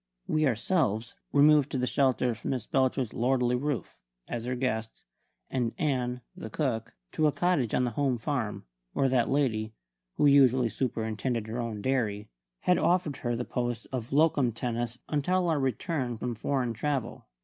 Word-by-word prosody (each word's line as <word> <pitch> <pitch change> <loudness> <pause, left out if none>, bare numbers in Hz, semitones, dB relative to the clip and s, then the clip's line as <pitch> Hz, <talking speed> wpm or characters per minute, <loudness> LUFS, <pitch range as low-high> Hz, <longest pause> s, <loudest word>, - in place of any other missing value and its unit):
We 155 -1 +2
ourselves 115 - 0 0.2
removed 145 0 +5
to - - +1
the 125 - +1
shelter 125 -2 +2
of 115 0 -8
Miss 130 -4 -2
Belcher's 130 -3 +1
lordly 125 0 +2
roof, 140 0 -3 0.3
as 120 -1 -4
her 125 +1 -1
guests; 115 -3 -2 0.4
and 120 -3 -1
Ann, 125 -4 -1
the 180 - -7
cook, 115 -6 -2 0.2
to 155 -1 +2
a - - +3
cottage 160 -9 +1
on - - +2
the 120 - 0
home 130 +1 0
farm, 120 - -3 0.3
where 135 - +2
that 125 -2 +2
lady 110 -6 0 0.4
who - - +2
usually 130 -4 +5
superintended 115 -1 -2
her 110 +2 -4
own 110 -4 -4
dairy 110 -6 -1 0.3
had 180 0 +3
offered 170 -6 +1
her 120 -1 -2
the 120 +1 -3
post 120 -2 -2
of 125 -3 -4
locum 145 -4 +3
tenens 120 0 -3
until 175 +5 +1
our 155 -3 +2
return 130 -2 -1
from 120 +2 -3
foreign 125 +1 -1
travel. 135 +2 -3
125 Hz, 165 wpm, -29 LUFS, 115-140 Hz, 0.4 s, removed